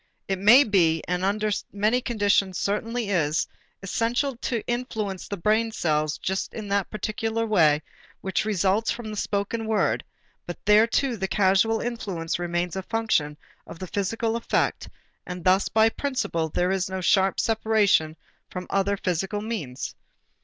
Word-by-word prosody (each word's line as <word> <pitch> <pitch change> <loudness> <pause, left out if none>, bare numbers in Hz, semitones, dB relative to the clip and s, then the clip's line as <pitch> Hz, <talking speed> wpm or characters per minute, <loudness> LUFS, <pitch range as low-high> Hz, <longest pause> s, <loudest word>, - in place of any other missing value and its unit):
It 195 -1 -1
may 235 +8 +8
be, 170 - +2
and 180 +1 -1
under 210 +2 0 0.2
many 215 +5 +1
conditions 205 -6 +1
certainly 225 +2 -2
is, 160 -5 +1 0.4
essential 240 +7 0
to 235 -2 -3
influence 220 -6 -3
the 200 - -4
brain 215 +5 +1
cells 155 -6 0
just 190 +4 -3
in 215 -2 -5
that 200 -1 0
particular 225 +2 -2
way 155 -8 +3 0.4
which 190 - -1
results 205 +1 +1
from 230 -2 -3
the - - -5
spoken 205 +2 -2
word, 220 -1 +1 0.4
but 175 - -5
there 210 +2 +6
too 245 +1 0
the 190 -1 -2
causal 200 +4 +2
influence 195 -10 -3
remains 175 0 -2
a 190 - -2
function 190 -9 0 0.3
of - - -9
the 185 - -6
physical 220 +5 -1
effect 235 - -1 0.4
and 180 -1 -6
thus 185 +2 +3
by 220 0 +4
principle 225 - -2
there 180 +4 0
is 190 -1 -1
no 190 0 -3
sharp 190 +1 +2
separation 210 -8 +2 0.3
from 180 0 -6
other 195 +1 +1
physical 190 +3 -2
means. 200 - -5
200 Hz, 155 wpm, -25 LUFS, 180-225 Hz, 0.4 s, may